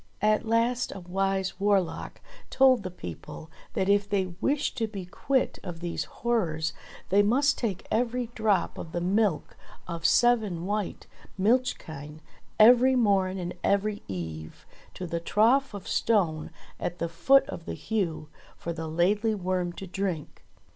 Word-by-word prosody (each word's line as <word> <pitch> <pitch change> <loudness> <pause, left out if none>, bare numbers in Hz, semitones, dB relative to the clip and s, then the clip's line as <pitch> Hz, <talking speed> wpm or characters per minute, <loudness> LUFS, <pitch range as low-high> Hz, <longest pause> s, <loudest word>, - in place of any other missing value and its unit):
At 215 +1 +2
last 235 +3 +1
a - - -6
wise 190 +2 -1
warlock 195 -3 0 0.3
told 260 -3 +5
the 185 - -5
people 90 - -9 0.2
that 190 - 0
if 200 0 +3
they 190 -3 0
wished 290 +1 0
to 225 - +1
be 200 -4 -7
quit 255 +8 -1
of 175 -3 -7
these 170 0 -3
horrors, 165 -10 -1 0.4
they 200 +2 +5
must 265 +7 +3
take 205 -7 -3
every 240 +1 0
drop 215 -5 0
of 165 - -8
the 175 - -1
milk 190 -1 0 0.3
of 170 -2 -5
seven 215 -8 +3
white 205 0 -3 0.3
milch 240 +7 +2
kine 150 0 -9 0.4
every 250 +4 +7
morn 195 -5 +2
and 175 -1 -4
every 205 +1 +1
eve 80 -4 -7 0.3
to 185 - -5
the 170 -1 -2
trough 225 +8 +2
of 200 - -8
stone 175 -9 +1 0.3
at 175 - -3
the 170 - -2
foot 265 +12 +4
of 165 - -7
the - - -3
Heugh, 180 -9 -2 0.3
for 170 - -4
the 160 -1 -5
Laidly 205 +7 +1
Worm 185 -2 -1
to 195 - -8
drink. 185 -4 -4
195 Hz, 155 wpm, -27 LUFS, 175-225 Hz, 0.4 s, every